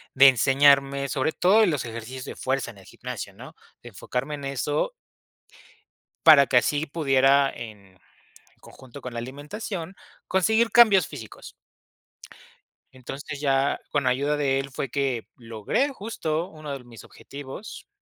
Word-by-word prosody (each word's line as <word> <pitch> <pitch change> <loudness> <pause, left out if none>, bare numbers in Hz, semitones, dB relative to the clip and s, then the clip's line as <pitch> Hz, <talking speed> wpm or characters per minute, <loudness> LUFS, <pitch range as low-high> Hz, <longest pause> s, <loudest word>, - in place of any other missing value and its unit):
de 135 +1 +8
enseñarme, 140 +2 +3
sobre 140 +3 -1
todo, 195 +5 +4
en 205 - +3
los 145 -5 -2
ejercicios 120 +3 -7
de - - -7
fuerza, 130 -2 -2
en 100 - -17
el 95 - -17
gimnasio, - - -7
¿no? - - -12 0.3
De - - -10
enfocarme 135 +4 -4
en 140 -1 -8
eso 140 - -1 1.3
para 150 -4 +9
que 125 - +3
así 145 +5 +1
pudiera, 140 -3 +3
en 105 -7 -11 0.6
conjunto 130 +1 -13
con 125 - -7
la 120 - -6
alimentación, 160 - -6 0.3
conseguir 220 +5 +2
cambios 220 -6 +6
físicos. 115 -8 -11 1.4
Entonces, 135 +2 -8
ya 135 -1 +1
con 145 -2 0
ayuda 140 +4 +1
de 135 -2 +1
él 135 0 -5
fue 135 0 -4
que 135 -4 -2
logré, 115 - -1
justo, 185 - -4
uno 155 -4 -8
de 130 - -15
mis 120 -2 -14
objetivos. 145 +9 -10
140 Hz, 145 wpm, -25 LUFS, 130-155 Hz, 1.4 s, para